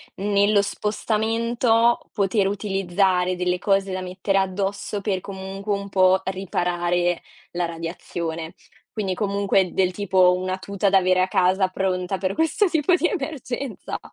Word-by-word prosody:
nello 200 +1 +2
spostamento, 230 +3 +1
poter 200 -1 +1
utilizzare 190 -2 0
delle 180 0 -1
cose 195 -1 +1
da 185 0 -3
mettere 185 +2 -1
addosso 195 +2 -2
per, 190 -2 -1
comunque, 195 +1 -5
un 200 0 -4
po' 185 0 +4
riparare 175 -2 -1 0.3
la 175 0 -1
radiazione. 165 -1 -5 0.4
Quindi, 195 -4 -2
comunque, 200 -2 +1
del 185 -1 +1
tipo, 185 -2 +3
una 185 +1 -2
tuta 200 +1 -1
da 195 - +5
avere 185 0 +3
a 185 - +2
casa, 185 +1 +2
pronta 185 0 -2
per 190 +1 -2
questo 325 - +2
tipo 330 +1 +2
di 345 - 0
emergenza. 275 - -4
195 Hz, 135 wpm, -23 LUFS, 185-205 Hz, 0.4 s, da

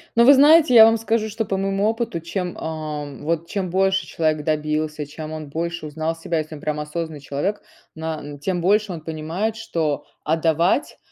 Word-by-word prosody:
Но 235 - +6
вы 280 - +9
знаете, 300 +1 +6
я 225 -2 +10
вам 225 0 +4
скажу, 225 -1 0
что 220 +1 -3
по 195 -1 -2
моему 195 +1 0
опыту, 225 -5 -1
чем, 175 +2 -4
ам, 150 -3 -5
вот, 165 +1 -1
чем 190 -1 -3
больше 190 +1 +1
человек 155 -2 0
добился, 155 0 -1
чем 155 +2 -8
он 155 -2 -6
больше 170 +2 -3
узнал 160 +2 -3
себя, 165 0 -2
если 155 +1 -5
он 145 - -11
прям 150 0 -2
осознанный 155 0 -4
человек, 145 +9 -2 0.3
на 160 -1 -4
н 145 0 -9
тем 175 +4 -2
больше 205 +3 +2
он 165 - -7
понимает, 160 +8 -3
что 165 -10 -2 0.2
отдавать- 165 - +1
165 Hz, 190 wpm, -22 LUFS, 155-195 Hz, 0.3 s, я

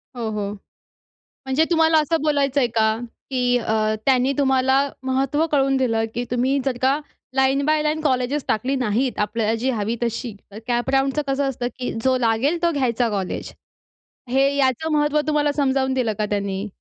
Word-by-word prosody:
हो, 235 -2 -3
हो. 205 -1 -3 0.9
म्हणजे 265 +4 +2
तुम्हाला 320 -1 +4
असं 320 +1 0
बोलायचयं 285 -3 +2
का? 220 0 +2 0.3
की 250 -2 +1
अ, 215 -2 0
त्यांनी 265 0 +3
तुम्हाला 265 -1 +3 0.2
महत्त्व 270 +4 +1
कळवून 270 -2 +2
दिलं 230 -4 +1
की 240 - -1
तुम्ही 255 +3 +1
जर 260 -3 -1
का 270 +3 +2 0.4
लाईन 270 +1 +2
बाय 310 0 +2
लाईन 305 +1 0
कॉलेजेस 265 0 0
टाकली 255 +5 0
नाहीत, 250 0 0
आपल्याला 215 +1 0
जी 255 +3 0
हवी 220 -1 -2
तशी. 235 -1 -3 0.2
तर 205 - -8
कॅप 240 +1 0
राउंडचं 270 +2 +1
कसं 275 0 0
असतं? 245 -2 -3
की 250 - -2
जो 260 -1 +3
लागेल 250 +8 +1
तो 340 - +3
घ्यायचा 245 -5 0
कॉलेज. 195 -3 -3 0.8
हे 270 +2 +3
याचं 275 +4 +1
महत्त्व 300 0 +2
तुम्हाला 295 -1 +2
समजावून 265 -2 +1
दिलं 245 -4 0
का 210 - +1
त्यांनी? 200 0 -2
260 Hz, 170 wpm, -22 LUFS, 235-280 Hz, 0.9 s, तुम्हाला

